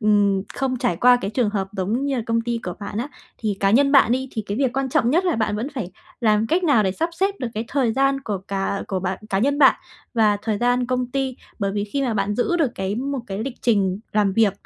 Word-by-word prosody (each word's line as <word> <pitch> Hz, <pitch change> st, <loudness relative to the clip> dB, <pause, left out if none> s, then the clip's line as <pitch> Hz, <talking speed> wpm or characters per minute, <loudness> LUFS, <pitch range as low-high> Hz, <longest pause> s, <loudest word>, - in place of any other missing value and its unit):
ừm, 205 Hz, -3 st, +3 dB
không 265 Hz, -2 st, -1 dB
trải 175 Hz, -8 st, 0 dB
qua 250 Hz, +4 st, +6 dB
cái 195 Hz, -, -3 dB
trường 230 Hz, -3 st, +1 dB
hợp 195 Hz, -2 st, -2 dB
giống 210 Hz, +8 st, -1 dB
như 275 Hz, -2 st, 0 dB
là 235 Hz, -, -1 dB
công 230 Hz, 0 st, +1 dB
ty 235 Hz, 0 st, -2 dB
của 180 Hz, -, -4 dB
bạn 205 Hz, +1 st, -5 dB
á. 255 Hz, +5 st, -2 dB, 0.3 s
Thì 210 Hz, -3 st, -2 dB
cá 195 Hz, -, +3 dB
nhân 275 Hz, +6 st, +4 dB
bạn 255 Hz, -4 st, +6 dB
đi, 260 Hz, +1 st, -1 dB
thì 220 Hz, -, -3 dB
cái 205 Hz, -, -3 dB
việc 260 Hz, -3 st, +1 dB
quan 270 Hz, 0 st, 0 dB
trọng 240 Hz, -1 st, +2 dB
nhất 350 Hz, +5 st, +2 dB
là 350 Hz, -8 st, +1 dB
bạn 215 Hz, -1 st, 0 dB
vẫn 235 Hz, +6 st, -3 dB
phải 200 Hz, -8 st, -4 dB, 0.3 s
làm 215 Hz, -1 st, +3 dB
cách 350 Hz, +6 st, +1 dB
nào 280 Hz, -9 st, +4 dB
để 190 Hz, -2 st, 0 dB
sắp 330 Hz, -, -1 dB
xếp 390 Hz, +3 st, 0 dB
được 250 Hz, -, -2 dB
cái 220 Hz, +2 st, -2 dB
thời 255 Hz, -5 st, +1 dB
gian 275 Hz, +1 st, +2 dB
của 210 Hz, -7 st, -3 dB
cả 195 Hz, 0 st, -2 dB
của 190 Hz, -2 st, -1 dB
bạn 185 Hz, +1 st, -2 dB
cá 195 Hz, -, +1 dB
nhân 280 Hz, +7 st, +1 dB
bạn, 270 Hz, -, +7 dB, 0.4 s
và 215 Hz, -2 st, +3 dB
thời 215 Hz, -3 st, -1 dB
gian 245 Hz, 0 st, +1 dB
công 255 Hz, -1 st, -1 dB
ty, 265 Hz, -2 st, -2 dB, 0.2 s
bởi 195 Hz, -1 st, -1 dB
vì 205 Hz, 0 st, -1 dB
khi 275 Hz, +7 st, -2 dB
mà 240 Hz, -4 st, 0 dB
bạn 200 Hz, 0 st, 0 dB
giữ 300 Hz, +9 st, +1 dB
được 300 Hz, -7 st, +1 dB
cái 190 Hz, +1 st, -2 dB
một 270 Hz, +3 st, -2 dB
cái 195 Hz, 0 st, -5 dB
lịch 245 Hz, +3 st, -4 dB
trình 200 Hz, -4 st, +1 dB
làm 205 Hz, -2 st, +2 dB
việc 210 Hz, -1 st, +3 dB
230 Hz, 270 wpm, -22 LUFS, 205-265 Hz, 0.4 s, bạn